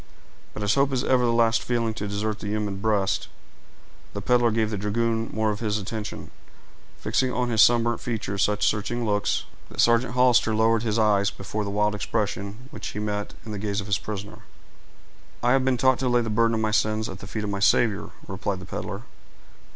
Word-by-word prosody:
But 105 - -4
as 100 0 +2
hope 140 +2 +2
is 125 - 0
ever 130 -1 +3
the 120 - +3
last 115 -1 +3
feeling 115 -2 -1
to 105 -2 -4
desert 105 +1 -2
the - - -6
human 105 -1 -2
breast, 100 -2 0 0.9
the - - -4
peddler 120 -1 +3
gave 110 -1 0
the 105 - -2
dragoon 115 +2 0
more 110 -1 0
of 105 - -4
his 110 -2 -1
attention, 105 +1 -6 0.7
fixing 130 -1 0
on 125 -1 -1
his 110 -2 +4
sunburned 120 0 +4
features 105 -4 -3
such 105 0 +2
searching 115 +3 -1
looks, 105 -1 0 0.3
that - - -11
Sergeant 120 +1 +3
Hollister 125 -3 +4
lowered 110 0 +3
his 110 -2 -1
eyes 105 -2 +3
before 105 +2 -4
the 100 - -4
wild 105 +1 +1
expression 105 +2 -3
which - - -6
he - - -5
met 105 -1 -3
in 110 - -6
the 105 - -4
gaze 100 0 -2
of 100 - -3
his 100 -1 0
prisoner. 105 -1 -6 1.0
"I 120 - +3
have 135 0 +3
been 130 -1 +2
taught 130 +1 +3
to 130 - 0
lay 120 0 +3
the 115 -2 -3
burden 115 +1 +2
of 110 - -1
my 110 -1 0
sins 110 0 +1
at 95 - -8
the 100 - -9
feet 110 +1 -4
of 105 - -3
my 100 - -2
Savior," 105 +1 +2 0.2
replied 100 -2 -3
the 90 - -9
peddler. - - -5
110 Hz, 210 wpm, -25 LUFS, 105-115 Hz, 1.0 s, his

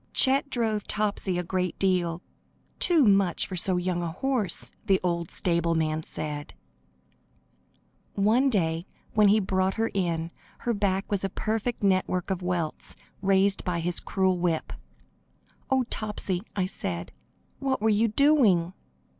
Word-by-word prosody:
Chet 275 +1 +3
drove 220 -5 -1
Topsy 205 -3 -1
a 180 - -1
great 180 0 -2
deal; 180 -3 0 0.6
"too 335 -5 +6
much 195 -4 +3
for 185 - -6
so 180 +1 +3
young 180 0 -1
a 170 -1 -3
horse," 250 -1 0
the 195 -3 +3
old 170 -2 -1
stableman 165 -3 0
said. 150 -2 -6 1.6
One 225 +7 +3
day 170 -5 0 0.3
when 210 -1 +5
he 210 +2 +5
brought 190 -1 0
her 225 0 -1
in, 170 -3 -1 0.3
her 240 - 0
back 200 -2 -1
was 200 -2 +1
a 195 - 0
perfect 220 +4 -2
network 185 -1 +1
of 185 -1 -2
welts, 175 -3 -3 0.3
raised 195 0 +2
by 180 -2 -1
his 175 +1 +1
cruel 190 -2 0
whip. 170 -2 -1 1.0
"Oh, 265 -1 +3
Topsy," 205 -4 -2
I 190 -3 +1
said, 90 - -4 0.5
"what 270 -1 -1
were 220 +1 +2
you 215 +2 +3
doing?" 215 - +3
190 Hz, 140 wpm, -27 LUFS, 175-215 Hz, 1.6 s, too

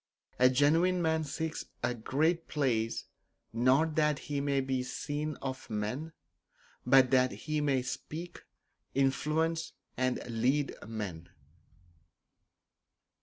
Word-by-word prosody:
A 125 0 +7
genuine 160 +7 +3
man 160 -1 +1
seeks 160 +2 -4 0.2
a - - +1
great 155 +9 0
place, 120 -7 0 0.5
not 130 +7 +3
that 150 -2 +3
he 145 -1 -3
may 140 -1 +1
be 130 -1 0
seen 145 +4 -3
of 130 -1 -5
men, 110 +9 -3 0.7
but 130 -1 +5
that 130 -1 +4
he 155 -1 -2
may 135 -3 +1
speak, 165 +6 -6 0.5
influence 155 +5 +1 0.2
and 130 0 0
lead 125 +5 +1
men. 100 -7 -5
140 Hz, 110 wpm, -31 LUFS, 125-155 Hz, 0.7 s, A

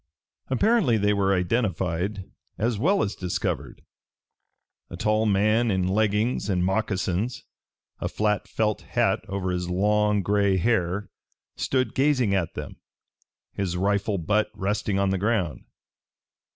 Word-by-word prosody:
Apparently 160 - +3
they 105 0 +2
were 100 -1 +1
identified 95 -1 -1 0.3
as 110 +2 0
well 195 - +3
as 100 - -2
discovered. 90 -2 -3 1.1
A - - -8
tall 110 +1 +1
man 105 +4 +3
in 95 -2 +1
leggings 105 +2 +1
and 90 -2 +1
moccasions, 100 +3 -1 0.6
a - - -2
flat 105 -1 0
felt 110 -1 -1
hat - - +1
over 95 -1 -2
his 90 0 -2
long 105 +2 +2
gray 100 0 +2
hair, 100 -1 0 0.4
stood 130 -1 0
gazing 130 -7 +2
at 90 -4 -1
them, - - -7 0.8
his 90 -3 -2
rifle 100 +2 0
butt 105 +5 +1
resting 105 0 -1
on 100 -1 +2
the 95 - 0
ground. 95 - -1
100 Hz, 125 wpm, -25 LUFS, 95-110 Hz, 1.1 s, Apparently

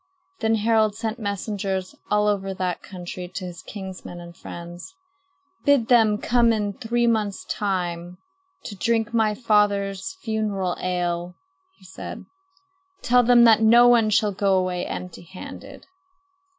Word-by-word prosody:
Then 225 0 +2
Harald 220 -1 +2
sent 225 +1 -4
messengers 200 -2 -3 0.2
all 210 0 +2
over 195 -2 -1
that 185 -2 -2
country 180 -1 -7
to 185 +1 -6
his 175 -2 -8
kinsmen 190 -3 -8
and 170 0 -11
friends. 175 - -9 0.7
"Bid 280 -5 +3
them 220 -4 +5
come 235 +1 +3
in 210 -2 -1
three 240 +2 -1
months' 215 -4 0
time 180 -3 -3 0.5
to 205 - -7
drink 230 +2 0
my 220 -2 +2
father's 205 - +1
funeral 210 -5 -1
ale," 175 -1 -2 0.4
he - - -20
said. - - -8 0.8
"Tell 245 +1 +5
them 240 0 +6
that 225 -2 +6
no 235 +2 +7
one 235 -3 +5
shall 210 0 +2
go 195 -1 +2
away 180 -1 -1
empty 180 -1 -6
handed." 180 +2 -11
205 Hz, 135 wpm, -23 LUFS, 185-225 Hz, 0.8 s, no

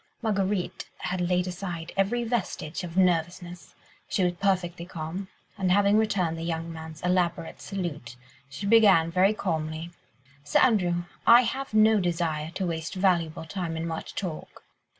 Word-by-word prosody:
Marguerite 200 -3 -1
had 185 0 -3
laid 180 0 +1
aside 180 -2 -5
every 210 +5 +1
vestige 200 -8 -3
of 175 0 -6
nervousness; 175 -1 0 0.3
she 190 - +1
was 180 0 +2
perfectly 175 -2 -1
calm, 175 +3 -6 0.3
and 185 -2 +1
having 200 +2 +4
returned 185 -7 +1
the - - -4
young 165 0 -3
man's 160 0 -9
elaborate 175 -2 0
salute, 155 -11 -5 0.3
she 170 +9 -6
began 200 -7 +5
very 190 +4 +3
calmly,— 160 -3 -3 0.5
"Sir 145 - +1
Andrew, 180 -8 +3 0.2
I 235 +1 +9
have 260 0 -3
no 215 0 +6
desire 165 -4 -1
to 190 - -1
waste 165 +1 -3
valuable 170 -4 +1
time 165 -1 -4
in 165 - -3
much 160 -1 -5
talk. 175 -6 -6
180 Hz, 150 wpm, -27 LUFS, 165-195 Hz, 0.5 s, I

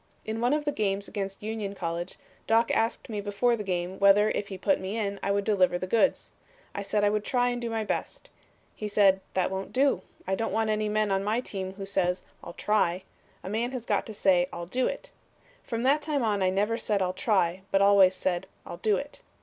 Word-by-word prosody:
In 220 +1 -3
one 245 +3 +2
of 300 0 0
the 290 - +1
games 200 -5 -1
against 195 -1 -5
Union 215 -2 -4
College 170 0 -4 0.3
Doc 230 +1 +3
asked 225 +1 0
me 210 -3 -4
before 205 +4 +1
the 215 - -5
game 180 -1 -3
whether 200 +2 +5
if 205 - -2
he 195 - -6
put 285 +10 +1
me 190 +4 -4
in 200 -2 -2
I - - -2
would 200 0 +1
deliver 185 -4 +2
the 185 - -4
goods. 230 +8 +1 0.4
I - - -4
said 205 +1 0
I 205 - +4
would 210 0 0
try 245 +2 +1
and 245 0 -3
do 235 - -3
my 225 -1 -1
best. 355 - -4 0.5
He 210 - -4
said, 195 -2 +4
'That 185 -1 +1
won't 190 0 -4
do. 265 -7 +2 0.2
I 190 - -1
don't 225 +4 -1
want 220 -1 +1
any 215 0 0
man 210 -1 +1
on 195 0 +1
my 215 +3 +1
team 190 -6 -5
who 195 0 -6
says, 185 -2 0 0.2
"I'll 170 - -8
try." 185 -3 +1 0.4
A - - -7
man 230 +5 -1
has 245 -3 -5
got - - 0
to 220 - -7
say 180 -2 +3
"I'll 170 0 -6
do 250 +8 0
it." - - -6 0.5
From 230 0 -4
that 280 +4 +3
time 290 -3 -1
on 210 -3 +1
I 185 - +3
never 210 +5 0
said, 205 -4 0
'I'll 180 0 -1
try,' 185 -3 +1
but 195 - +3
always 195 -2 +6
said 185 0 -1 0.2
'I'll - - -7
do 210 0 +2
it.' 285 +1 -7
205 Hz, 230 wpm, -28 LUFS, 190-225 Hz, 0.5 s, always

